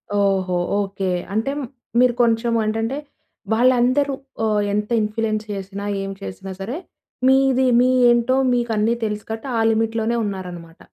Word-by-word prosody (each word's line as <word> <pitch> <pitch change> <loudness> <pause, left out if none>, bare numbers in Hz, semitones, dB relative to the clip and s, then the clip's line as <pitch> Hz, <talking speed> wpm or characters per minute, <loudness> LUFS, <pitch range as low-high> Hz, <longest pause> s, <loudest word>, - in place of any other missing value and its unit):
ఓహో! 190 -3 +1 0.2
ఓకే. 195 -1 -3 0.2
అంటే 225 +6 0
మ్ - - -3 0.3
మీరు 250 -1 +5
కొంచెం 230 0 +2
ఏంటంటే, 225 +5 -1 0.6
వాళ్ళందరూ 255 +4 +3 0.3
ఆహ్, 210 -1 +2
ఎంత 210 0 -1
ఇన్ఫ్లుయెన్స్ 215 0 -1
చేసినా 195 +1 -6 0.2
ఏం 195 - -4
చేసినా 95 - -7
సరే, 235 +9 -4 0.5
మీది 265 -1 +4
మీ 250 - +4 0.2
ఏంటో 240 +2 +2 0.2
మీకన్నీ 230 -2 +1
తెలుసు 210 -1 -4
కాబట్టి 225 +5 -5
ఆ 225 - +2
లిమిట్‌లోనే 225 +1 0
ఉన్నారన్నమాట. 180 -4 -7
220 Hz, 130 wpm, -21 LUFS, 200-240 Hz, 0.6 s, మీరు